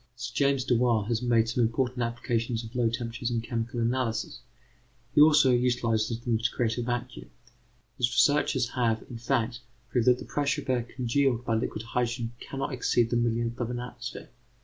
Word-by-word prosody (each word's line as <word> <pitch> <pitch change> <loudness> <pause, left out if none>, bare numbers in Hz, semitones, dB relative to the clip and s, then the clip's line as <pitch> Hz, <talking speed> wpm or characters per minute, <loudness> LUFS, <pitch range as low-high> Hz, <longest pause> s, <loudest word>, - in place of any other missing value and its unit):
Sir 120 -2 -6
James 140 0 +2
Dewar 120 -3 +2
has 115 +1 -1
made 115 -2 +3
some 115 +2 0
important 125 +2 0
applications 115 0 -1
of 115 +1 -10
low 120 -2 +2
temperatures 115 0 -3
in 120 -1 0
chemical 115 +1 -3
analysis; 115 -1 -1 0.7
he 145 - +6
also 150 -3 +6
utilizes 115 -2 +1
them 120 -2 0
to 115 0 +1
create 115 -1 -1
a - - 0
vacuum. 120 +1 -4 0.7
His 120 -2 +3
researches 130 -1 +2
have, 115 -3 0
in 115 - -7
fact, 120 -1 -1 0.3
proved 120 -1 +1
that 125 0 +6
the - - -9
pressure 145 0 -1
of 140 - -11
air 125 -1 +1
congealed 125 +1 0
by 115 - 0
liquid 110 0 -2
hydrogen 120 0 -2
cannot 135 0 -4
exceed 120 -2 +1
the - - +1
millionth 120 0 0
of 120 -2 -2
an 120 0 -3
atmosphere. 120 -1 -7
120 Hz, 180 wpm, -28 LUFS, 115-125 Hz, 0.7 s, he